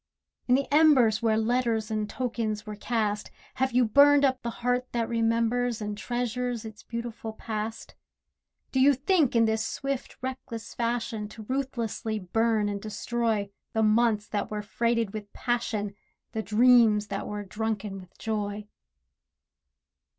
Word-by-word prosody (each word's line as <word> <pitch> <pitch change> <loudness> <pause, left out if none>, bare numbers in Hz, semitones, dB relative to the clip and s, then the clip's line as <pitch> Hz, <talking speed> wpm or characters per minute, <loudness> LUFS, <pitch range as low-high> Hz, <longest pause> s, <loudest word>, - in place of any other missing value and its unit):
In 250 - +5
the 275 +1 +1
embers 270 -9 +5
Where 220 -1 +2
letters 225 -1 0
and 215 -1 -1
tokens 220 -3 -2
were 210 -1 -6
cast, 210 -1 -1 0.3
Have 265 0 +1
you 245 0 +4
burned 285 +5 +6
up 260 -1 +1
the 235 - -3
heart 245 +2 -1
that 230 -2 0
remembers, 230 +1 +1
And 210 -1 -3
treasures 245 +1 -2
its 220 -1 -9
beautiful 235 -1 -6
past? 220 0 -5 0.8
Do 265 - +1
you 275 +2 +6
think 295 -1 +2
in 230 -1 +5
this 220 0 +1
swift 275 -2 -4
reckless 255 -3 -6
fashion 230 -3 -2
To 220 0 -10
ruthlessly 235 -3 -2
burn 215 +2 +1
and 200 -1 -3
destroy 220 -1 -1 0.2
The 220 - +2
months 215 -1 +3
that 205 - -2
were 210 -1 -4
freighted 230 0 0
with 210 -1 -7
passion, 225 -4 -1 0.4
The 220 - -2
dreams 220 -2 +5
that 195 0 -3
were 210 0 -4
drunken 210 -1 -3
with 185 -2 -15
joy? 210 -1 -3
225 Hz, 145 wpm, -27 LUFS, 215-245 Hz, 0.8 s, burned